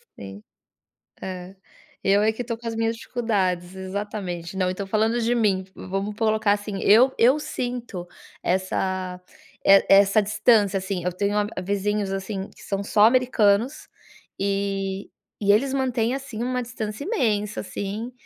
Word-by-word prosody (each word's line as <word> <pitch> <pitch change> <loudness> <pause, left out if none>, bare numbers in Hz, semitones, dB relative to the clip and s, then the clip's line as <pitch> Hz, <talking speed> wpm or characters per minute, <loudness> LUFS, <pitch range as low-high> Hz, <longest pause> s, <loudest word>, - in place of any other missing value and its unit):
Sim, 100 +1 -10 0.8
é, 185 0 -7 0.5
eu 200 +1 +3
é 220 +1 +3
que 220 - -4
estou 235 -1 -4
com 235 - -12
as 230 - -2
minhas 225 0 0
dificuldades, 190 -7 -1
exatamente. 190 -2 -5
Não, 185 -1 +1
então 195 +2 -4
falando 220 +4 +1
de 235 +1 +1
mim 200 -5 +1
vamos 195 +3 -4
colocar 215 -2 +2
assim, 205 -1 -3
eu 245 +6 +6
eu 255 +6 +5
sinto 245 -10 -4 0.4
essa 185 0 -1 0.4
eh, 195 0 +7
essa 200 +2 +6
distância, 210 -1 +3
assim, 185 -2 -4
eu 180 - 0
tenho 200 +3 -1
a 210 -2 -1
vizinhos, 200 +1 -1
assim, 195 0 -4
que - - -16
são 200 0 -3
só 210 +1 +4
americanos 245 +1 +2 0.5
e 195 0 -2 0.3
eles 215 +7 +3
mantêm, 250 -3 0
assim, 270 -5 -5
uma 250 0 -1
distância 230 0 -5
imensa, 210 - 0
assim, 205 +5 -5
205 Hz, 145 wpm, -24 LUFS, 195-230 Hz, 0.8 s, eh